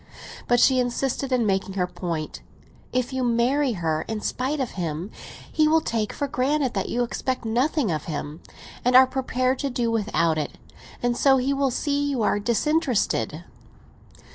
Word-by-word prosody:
But 245 - +4
she 260 +1 +5
insisted 255 +2 -1
on 250 -3 +2
making 195 -1 0
her 180 -2 +1
point. 170 -4 -5 0.5
"If 255 +1 -1
you 260 -1 -1
marry 245 +3 +2
her 160 -5 -1
in 220 -1 -3
spite 265 +7 -2
of 260 -3 -2
him, 170 +1 -4 0.4
he 310 -1 +3
will 320 +1 +5
take 225 -8 -2
for 285 - -3
granted 275 0 0
that - - -2
you 245 - 0
expect 255 +1 -3
nothing 250 - +1
of 155 -2 -3
him, 150 0 -5 0.4
and 250 +1 +3
are 260 +1 +10
prepared 255 0 -1
to 280 - -1
do 240 -2 -1
without 180 -8 +1
it. 150 - -4 0.5
And 245 0 +1
so 270 +1 +4
he 265 +2 +1
will 275 -1 +1
see 285 +3 0
that - - 0
you 260 -5 0
are 205 - +2
disinterested." 250 +3 0
245 Hz, 175 wpm, -24 LUFS, 205-270 Hz, 0.5 s, are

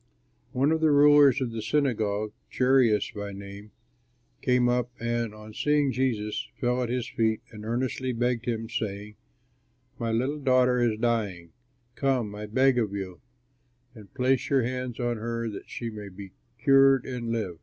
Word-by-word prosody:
One 135 +4 +2
of 160 0 +1
the 160 - +4
rulers 145 -2 +6
of 125 -3 -1
the 115 -1 -4
synagogue, 110 -5 0 0.2
Jairus 125 -5 +3
by 100 -1 -6
name, 100 +1 -10 0.7
came 125 -1 +3
up, 125 0 +1
and, 115 -1 -1
on 110 0 -12
seeing 150 0 +2
Jesus, 115 -4 -1
fell 125 0 0
at 120 - -2
his 125 -1 -2
feet 110 -1 0
and 105 -2 -10
earnestly 125 +3 -2
begged 120 0 -1
him, 115 -1 -2
saying, 105 -2 -4 0.9
"My 115 -2 -1
little 130 +6 -1
daughter 130 -2 +3
is 115 -3 +1
dying; 105 -8 -1 0.4
come, 125 -5 0
I 105 +1 -6
beg 130 +3 +3
of 105 -4 -1
you, 95 -3 -6 0.7
and 105 -5 -14
place 130 0 +1
your 135 -3 +3
hands 125 0 -4
on 120 -1 -1
her 115 +1 -3
that 105 - -9
she 115 -1 -5
may 105 -2 -8
be 95 0 -10 0.3
cured 135 +1 +5
and 125 -3 -4
live." 100 -8 -3
120 Hz, 165 wpm, -27 LUFS, 105-130 Hz, 0.9 s, rulers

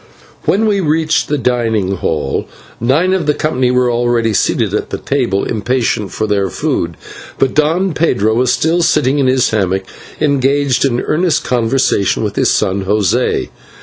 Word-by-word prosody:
When 220 +3 +2
we 205 -2 +1
reached 160 -2 +1
the 150 - -1
dining 115 -6 0
hall, 75 -5 -2 0.3
nine 150 +11 +2
of 180 -5 -1
the 150 - +2
company 130 -5 0
were 125 -1 +2
already 120 -2 +1
seated - - 0
at - - -2
the - - -4
table 95 +1 -1
impatient 115 -1 -1
for 110 - -2
their 100 -2 0
food, 85 -1 -2 0.4
but 135 - +1
Don 165 +5 +1
Pedro 120 -9 +1
was 125 +2 +2
still 165 +2 +1
sitting 145 -4 +2
in 135 - +2
his 130 -1 +2
hammock 95 -3 0 0.4
engaged 140 -2 +1
in 125 -2 0
earnest 170 +1 0
conversation 115 -5 +1
with 105 -1 -3
his - - +2
son 95 +1 0
José. 105 +5 0
125 Hz, 160 wpm, -15 LUFS, 105-150 Hz, 0.4 s, When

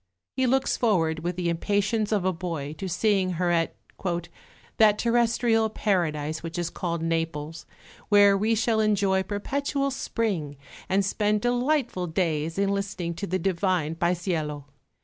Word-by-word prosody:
He 260 0 +1
looks 265 +2 +1
forward 165 -9 +1
with 175 +2 -3
the 180 -1 -2
impatience 205 +5 0
of 200 -4 +1
a 185 - +2
boy 165 -4 -4
to 190 - -4
seeing 190 0 +1
her 175 +1 0
at 165 -1 +1 1.0
"that 210 -2 +5
terrestrial 235 -1 +2
paradise 160 -8 -1
which 165 +1 -6
is 175 -1 -2
called 170 -2 -3
Naples, 165 -1 -3 0.4
where 205 -1 +6
we 215 +3 +1
shall 225 0 +1
enjoy 200 -3 +2
perpetual 275 +8 -2
spring 190 - -2 0.3
and 195 +1 +2
spend 210 +1 +1
delightful 245 -5 0
days 160 -1 -1
in 200 0 +2
listening 195 -4 -2
to 200 +4 -5
the 185 - 0
divine 180 -3 0
Paesiello. 165 -4 -1
190 Hz, 145 wpm, -26 LUFS, 165-215 Hz, 1.0 s, where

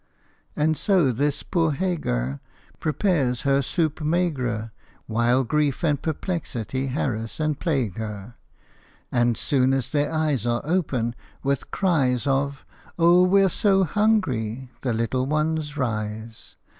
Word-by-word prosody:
And 155 +1 +2
so 185 -10 +3
this 145 +4 0
poor 165 -4 +1
Hagar 70 - -1 0.4
Prepared 150 - +1
her 140 0 +2
soupe 155 +2 -1
maigre, 135 -9 -1 0.3
While 120 +3 +2
grief 150 +4 0
and 145 -4 +1
perplexity 135 - -3
harass 120 -4 -2
and 155 -2 0
plague 130 - -1
her. 105 0 -6 0.8
And 120 -1 +2
soon 135 -3 +2
as 135 - -2
their 145 -1 +1
eyes 150 -7 0
Are 120 0 +1
open, 140 -9 0 0.3
with 140 -1 -1
cries 135 - +1
Of 140 0 0 0.2
" - - -25
Oh, 175 +1 +6
we 195 +2 +5
're - - +5
so 195 +1 +3
hungry! 140 - 0
" - - -35
the 125 - -1
little 115 +3 0
ones 155 0 -1
rise. 110 -3 -4
140 Hz, 135 wpm, -24 LUFS, 120-160 Hz, 0.8 s, Oh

